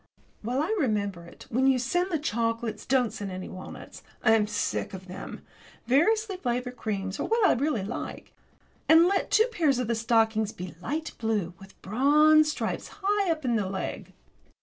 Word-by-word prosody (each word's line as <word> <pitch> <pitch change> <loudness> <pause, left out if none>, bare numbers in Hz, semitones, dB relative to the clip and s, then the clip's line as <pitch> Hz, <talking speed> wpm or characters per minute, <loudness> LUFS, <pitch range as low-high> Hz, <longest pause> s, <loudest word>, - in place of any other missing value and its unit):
While 250 +6 -1
I 410 +8 0
remember 205 - -1
it, 170 - -14
when 260 +3 +2
you 265 -1 +4
send 350 +10 0
the 325 - +1
chocolates 230 -4 -2
don't 250 -3 +2
send 200 -1 -5
any 185 0 -6
walnuts. 185 - -10 0.2
I 220 - +5
am 220 -2 +4
sick 210 -2 -2
of 185 0 -10
them. 185 +1 -8 0.4
Variously 390 - +2
flavoured 250 -4 -2
creams 195 -4 -4
are - - -1
what 450 -2 +3
I - - +5
really 255 -5 0
like. 210 +5 -6 0.6
And 325 +1 +8
let 390 +1 0
two 440 - +5
pairs 310 - +2
of 250 -2 -1
the 235 - +1
stockings 225 -1 +1
be 180 -4 -7
light 310 - -3
blue, 210 -6 -1
with 195 0 -15
bronze 300 +8 +5
stripes - - -3
high 405 -1 +1
up 320 -2 -1
the 255 - -1 0.2
leg. 190 -1 -5
245 Hz, 175 wpm, -27 LUFS, 210-310 Hz, 0.6 s, And